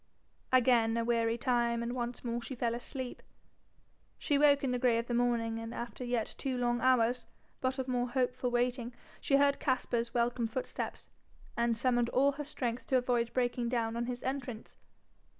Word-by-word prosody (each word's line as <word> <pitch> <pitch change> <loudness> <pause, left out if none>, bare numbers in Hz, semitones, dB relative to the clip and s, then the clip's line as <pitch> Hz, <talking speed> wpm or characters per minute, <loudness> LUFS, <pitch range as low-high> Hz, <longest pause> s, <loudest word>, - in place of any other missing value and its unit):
Again 235 -3 +4
a 230 - 0
weary 230 -1 +1
time, 235 -1 +1
and 235 +1 -3
once 240 -1 -4
more 240 0 -2
she 260 +3 -6
fell 235 -1 0
asleep. 250 +1 -6 1.0
She 290 - 0
woke 285 -1 +5
in 265 - +1
the 250 - 0
grey 240 -2 +3
of 230 - -1
the 240 - -3
morning, 235 -2 +1
and 225 +1 -6
after 240 +1 -6
yet 240 -3 -1
two 260 -2 -2
long 240 -1 0
hours, 250 -1 +3 0.3
but 260 +1 -1
of 260 -1 -3
more 245 -1 0
hopeful 250 0 0
waiting, 245 0 -1 0.2
she 275 - +2
heard 280 0 +4
Caspar's 240 -3 0
welcome 240 0 +1
footsteps, 250 +3 -5 0.5
and 235 -1 +1
summoned 240 -1 +2
all 275 +2 +3
her 290 +2 -5
strength 250 -4 -4
to 260 - +3
avoid 245 -2 +1
breaking 245 -1 0
down 230 -2 -1
on 235 0 -2
his 250 -1 -4
entrance. 255 -4 -4
245 Hz, 180 wpm, -32 LUFS, 235-255 Hz, 1.0 s, woke